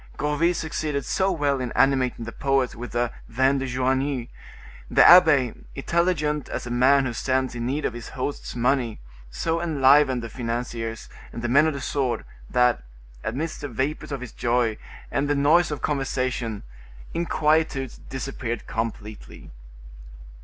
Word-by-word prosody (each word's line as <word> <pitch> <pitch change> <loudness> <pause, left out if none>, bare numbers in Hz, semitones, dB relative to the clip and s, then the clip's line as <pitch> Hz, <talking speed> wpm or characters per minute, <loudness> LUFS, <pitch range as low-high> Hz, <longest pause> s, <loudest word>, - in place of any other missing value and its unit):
Gourville 155 +4 +1
succeeded 150 -4 -3
so 195 0 +1
well 145 -6 0
in 125 - -3
animating 130 -3 +2
the 115 - -6
poets 135 0 0
with 120 +1 -8
the 120 0 0 0.2
vin 130 +4 +2
de 135 - -3
Joigny; 130 0 -1 0.6
the - - +6
abbe, 155 -9 +7 0.2
intelligent 150 -1 0
as - - -4
a 120 - -6
man 130 +3 +4
who 120 - -2
stands 130 +2 -1
in 120 0 -3
need 145 +4 -1
of - - -1
his 120 -1 -8
host's 135 0 -5
money, 125 -2 0 0.3
so 165 - -2
enlivened 140 -5 +4
the - - -4
financiers 115 -1 -4 0.2
and 115 - -7
the - - 0
men 140 +6 +5
of 155 - -1
the 140 - -5
sword, 130 -3 -1 0.2
that, 125 - +3 0.4
amidst 150 +8 -3
the 145 - -3
vapors 135 +5 -3
of 140 -2 -4
this 125 -3 -7
joy 120 -2 0 0.4
and 140 +1 0
the 145 - +2
noise 155 +5 +4
of 150 - -5
conversation, 130 -6 -2 0.5
inquietudes 155 -5 0
disappeared 130 -3 -4
completely. 110 -1 -6
135 Hz, 155 wpm, -24 LUFS, 120-145 Hz, 0.6 s, abbe